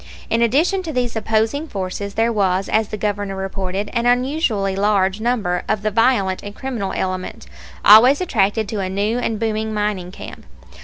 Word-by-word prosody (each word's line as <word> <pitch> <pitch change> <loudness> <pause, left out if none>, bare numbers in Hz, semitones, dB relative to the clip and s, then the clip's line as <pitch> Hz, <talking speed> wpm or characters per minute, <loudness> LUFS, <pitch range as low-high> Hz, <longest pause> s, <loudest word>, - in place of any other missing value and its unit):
In 230 - +2
addition 310 - +2
to 335 -3 -5
these 250 -4 -2
opposing 220 +7 0
forces 200 -2 -5
there 230 +1 +1
was, 195 -2 +1
as 220 -1 +1
the 215 - -5
Governor 205 -1 -2
reported, 190 +1 -4
an 235 0 0
unusually 245 - +1
large 200 0 +1
number 215 -7 0
of 215 -1 0
the 215 - 0
violent 215 -4 +2
and 205 0 -9
criminal 240 -7 -4
element, 185 -1 -4 0.4
always 240 +7 +8
attracted 220 - 0
to 215 - -3
a 190 -1 -2
new 205 +5 -1
and 225 -3 -2
booming 220 -1 -2
mining 205 -4 -2
camp. - - -10
215 Hz, 170 wpm, -20 LUFS, 195-235 Hz, 0.4 s, always